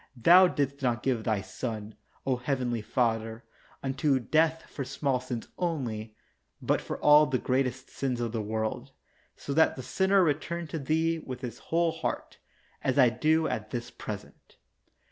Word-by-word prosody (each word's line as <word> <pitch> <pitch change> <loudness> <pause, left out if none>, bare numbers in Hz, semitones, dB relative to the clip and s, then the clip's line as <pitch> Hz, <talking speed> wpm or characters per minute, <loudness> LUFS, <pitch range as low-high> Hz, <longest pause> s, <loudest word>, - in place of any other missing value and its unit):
Thou 180 +9 +7
didst 140 -4 -2
not 120 -4 0
give 125 -4 0
Thy 110 -3 0
Son, 110 -1 -5 0.3
O 130 -2 +1
heavenly 125 -2 -1
Father, 115 -1 -1 0.4
unto 135 +1 +1
death 160 +5 +2
for 140 - -5
small 135 0 -1
sins 125 -2 -5
only, 120 -11 -3 0.4
but - - +1
for - - -5
all 150 +1 +7
the 130 -1 +1
greatest 130 +1 -1
sins 130 -3 -2
of 120 -2 -2
the 115 -1 -2
world, 110 +1 -3 0.4
so 140 - -5
that 160 +2 +4
the 130 - -7
sinner 190 +4 +3
return 170 +2 -1
to 160 - -3
Thee 160 +3 +1
with 130 -5 -7
his 120 -2 -6
whole 170 0 +2
heart, - - -4 0.4
as 130 - 0
I 125 -3 +7
do 155 +7 +2
at 110 -1 -3
this 120 0 -5
present. 105 -1 -9
130 Hz, 165 wpm, -29 LUFS, 115-155 Hz, 0.4 s, Thou